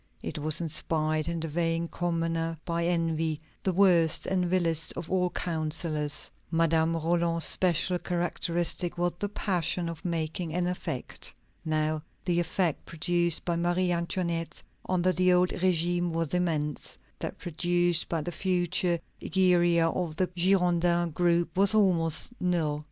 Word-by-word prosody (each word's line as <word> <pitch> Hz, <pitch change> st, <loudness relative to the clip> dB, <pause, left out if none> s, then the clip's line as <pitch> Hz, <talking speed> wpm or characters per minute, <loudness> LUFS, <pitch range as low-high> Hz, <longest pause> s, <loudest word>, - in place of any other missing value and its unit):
It -, -, -4 dB
was 155 Hz, +1 st, -1 dB
inspired 155 Hz, -1 st, 0 dB
in 170 Hz, 0 st, -2 dB
the 165 Hz, -, -2 dB
vain 165 Hz, +1 st, -1 dB
commoner 165 Hz, -1 st, -2 dB
by 170 Hz, 0 st, -1 dB
envy, 165 Hz, -2 st, 0 dB, 0.2 s
the 190 Hz, -, 0 dB
worst 175 Hz, -4 st, +4 dB
and 185 Hz, -2 st, 0 dB
vilest 165 Hz, -3 st, +1 dB
of 170 Hz, -1 st, -7 dB
all 180 Hz, -1 st, +2 dB
counsellors. 155 Hz, -3 st, -3 dB, 0.2 s
Madame 165 Hz, 0 st, +2 dB
Roland's 165 Hz, 0 st, +3 dB
special 180 Hz, 0 st, +3 dB
characteristic 175 Hz, 0 st, -1 dB
was 175 Hz, 0 st, 0 dB
the 205 Hz, -, -2 dB
passion 175 Hz, -4 st, -1 dB
for 165 Hz, +2 st, -7 dB
making 165 Hz, 0 st, -2 dB
an 180 Hz, 0 st, +1 dB
effect. 180 Hz, -7 st, -4 dB, 0.3 s
Now 155 Hz, 0 st, 0 dB, 0.2 s
the 175 Hz, -1 st, +1 dB
effect 175 Hz, -1 st, -1 dB
produced 170 Hz, 0 st, +1 dB
by 175 Hz, -, 0 dB
Marie 175 Hz, +1 st, +1 dB
Antoinette 170 Hz, -1 st, -2 dB, 0.3 s
under 185 Hz, 0 st, +2 dB
the 185 Hz, +1 st, +3 dB
old 180 Hz, 0 st, +3 dB
régime 175 Hz, -1 st, +1 dB
was 165 Hz, -1 st, -2 dB
immense; 155 Hz, -5 st, -1 dB, 0.2 s
that -, -, -5 dB
produced 175 Hz, 0 st, +1 dB
by 165 Hz, -2 st, -1 dB
the 175 Hz, -, -4 dB
future 175 Hz, 0 st, 0 dB, 0.2 s
Egeria 175 Hz, -3 st, +3 dB
of 165 Hz, -1 st, -2 dB
the 185 Hz, -, +1 dB
Girondin 175 Hz, -2 st, +2 dB
group 170 Hz, 0 st, +1 dB
was 200 Hz, +3 st, +4 dB
almost 180 Hz, -1 st, +1 dB
null. 165 Hz, -5 st, 0 dB
170 Hz, 140 wpm, -28 LUFS, 165-180 Hz, 0.3 s, worst